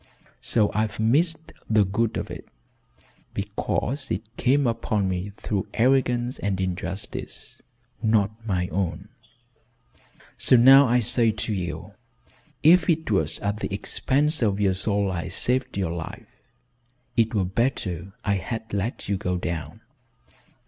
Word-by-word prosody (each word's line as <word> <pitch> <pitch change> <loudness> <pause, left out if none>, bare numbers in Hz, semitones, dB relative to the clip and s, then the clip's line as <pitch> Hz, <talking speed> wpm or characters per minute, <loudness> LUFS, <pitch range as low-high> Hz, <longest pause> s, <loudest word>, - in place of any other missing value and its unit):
So 105 -3 +1
I've 110 0 -1
missed 160 +8 +1 0.2
the 110 -2 +4
good 110 +4 0
of - - -4
it - - -8 0.9
because 115 +6 -2
it 110 +5 -4
came 135 +3 +2
upon 110 -4 0
me 95 +2 -3
through 100 -3 -2
arrogance 125 0 +2
and 100 -2 -1
injustice 95 0 -5 0.4
not 110 -3 +2
my 90 -5 -1
own. 90 0 -3 1.3
So - - +5
now 135 +3 +8
I 125 +1 +3
say 115 +1 +3
to 110 0 -2
you 90 -3 -5 0.7
if 175 +4 +6
it 160 -7 +1
was 80 -7 +1
at 100 +1 -2
the - - -4
expense 145 +9 +1
of 105 -3 +1
your 100 -2 +3
soul 100 +1 0
I 85 -2 -3
saved 130 -4 -1
your 95 -4 -1
life, 85 -1 -6 0.9
it 115 0 +2
were 100 -3 +2
better 95 -4 -2
I 100 -1 +2
had 110 +3 -5
let 100 +4 -3
you 100 0 0
go 90 -1 -2
down. 85 -3 -5
105 Hz, 135 wpm, -25 LUFS, 95-120 Hz, 1.3 s, now